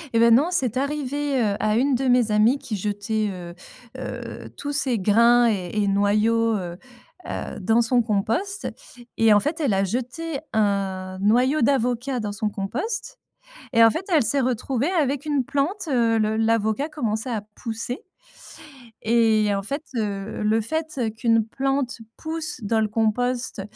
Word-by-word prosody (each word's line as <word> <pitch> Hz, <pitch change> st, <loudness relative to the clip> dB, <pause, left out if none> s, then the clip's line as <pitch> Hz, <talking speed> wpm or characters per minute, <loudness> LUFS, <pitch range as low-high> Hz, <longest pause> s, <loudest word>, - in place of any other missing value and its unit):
Eh -, -, +5 dB
ben, 230 Hz, 0 st, +6 dB
non, 300 Hz, +7 st, +3 dB
c'est 255 Hz, -, +1 dB
arrivé, 285 Hz, -1 st, -1 dB
heu, 205 Hz, -2 st, +1 dB
à 215 Hz, 0 st, +1 dB
une 265 Hz, +2 st, +2 dB
de 265 Hz, +2 st, -1 dB
mes 245 Hz, -3 st, +3 dB
amies 225 Hz, +6 st, +3 dB
qui 215 Hz, -4 st, -4 dB
jetait, 210 Hz, +2 st, -2 dB
heu 175 Hz, -2 st, -8 dB, 0.4 s
heu, 260 Hz, -, -7 dB
tous 290 Hz, -, -4 dB
ces 265 Hz, -6 st, +1 dB
grains 235 Hz, +4 st, +5 dB
et 185 Hz, -5 st, -2 dB
et 210 Hz, -1 st, +1 dB
noyaux, 215 Hz, +3 st, +2 dB
heu 175 Hz, -3 st, -5 dB, 0.5 s
heu, -, -, -5 dB
dans 225 Hz, +5 st, +3 dB
son 240 Hz, 0 st, +2 dB
compost, 235 Hz, -, -1 dB, 0.5 s
et 225 Hz, -1 st, +5 dB
en 205 Hz, -, +6 dB
fait, 305 Hz, +9 st, -2 dB
elle 270 Hz, -10 st, +1 dB
a 195 Hz, 0 st, +2 dB
jeté 255 Hz, -, -3 dB
un 195 Hz, -3 st, -1 dB
noyau 250 Hz, +8 st, +3 dB
d'avocat 250 Hz, 0 st, +1 dB
dans 210 Hz, -2 st, -3 dB
son 210 Hz, +1 st, -1 dB
compost 405 Hz, -, -4 dB, 0.5 s
et 230 Hz, 0 st, +6 dB
en 225 Hz, -, +8 dB
fait, 330 Hz, -, -3 dB
elle 305 Hz, -, +5 dB
s'est 275 Hz, +3 st, +1 dB
retrouvée 255 Hz, -, -1 dB
avec 290 Hz, -4 st, 0 dB
une 290 Hz, -3 st, +1 dB
plante, 325 Hz, -, -2 dB
heu, 230 Hz, -4 st, +2 dB
le 215 Hz, 0 st, +1 dB
l'avocat 225 Hz, +4 st, +1 dB
commençait 235 Hz, -5 st, -2 dB
à 215 Hz, -3 st, -2 dB
pousser. 230 Hz, +1 st, -4 dB, 1.1 s
Et 220 Hz, -2 st, +3 dB
en 195 Hz, -, -1 dB
fait, 280 Hz, +9 st, -4 dB
heu, 205 Hz, -1 st, -3 dB
le 220 Hz, +1 st, +2 dB
fait, 315 Hz, +5 st, -3 dB
heu, 230 Hz, -3 st, 0 dB
qu'une 225 Hz, 0 st, +1 dB
plante 270 Hz, +1 st, -1 dB, 0.2 s
pousse 320 Hz, -3 st, -3 dB
dans 220 Hz, +2 st, +1 dB
le 215 Hz, -, +1 dB
compost, 235 Hz, +1 st, -1 dB
230 Hz, 165 wpm, -23 LUFS, 215-275 Hz, 1.1 s, en